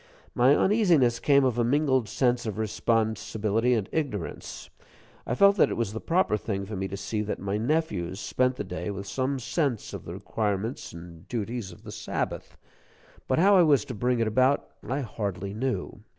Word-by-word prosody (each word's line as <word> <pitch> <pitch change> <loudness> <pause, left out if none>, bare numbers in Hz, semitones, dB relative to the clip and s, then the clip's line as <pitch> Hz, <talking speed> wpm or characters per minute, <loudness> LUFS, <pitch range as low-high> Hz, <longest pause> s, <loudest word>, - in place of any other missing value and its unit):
My 130 +4 +5
uneasiness 170 - +3
came 140 +1 +4
of 120 -2 +1
a - - +3
mingled 130 -2 +2
sense 120 -2 +1
of 110 - -4
responsibility 110 +1 0
and 105 -4 -1
ignorance. 130 - -4 0.6
I - - 0
felt 200 +6 +5
that - - +5
it - - -3
was 115 -3 -1
the 110 - -5
proper 170 - +2
thing 100 -2 -3
for 105 +2 -6
me 95 0 -2
to 100 - -6
see 105 +2 -2
that 105 - -3
my 100 +2 -2
nephews 110 - -1
spent 130 +3 0
the 135 - -4
day - - -5
with 100 -1 -5
some 130 +7 -1
sense 135 - -2
of - - -7
the - - -6
requirements 105 +2 -3
and 85 0 -12
duties 115 -3 -4
of 85 - -15
the - - -8
Sabbath; - - -4 0.7
but 130 - +1
how 195 +5 +6
I 185 - +7
was 145 -8 +4
to 130 - -6
bring 125 +2 0
it 115 - +2
about, 130 +5 +2
I 135 +3 -2
hardly 100 -5 -4
knew. 125 -1 -3
115 Hz, 190 wpm, -27 LUFS, 105-135 Hz, 0.7 s, I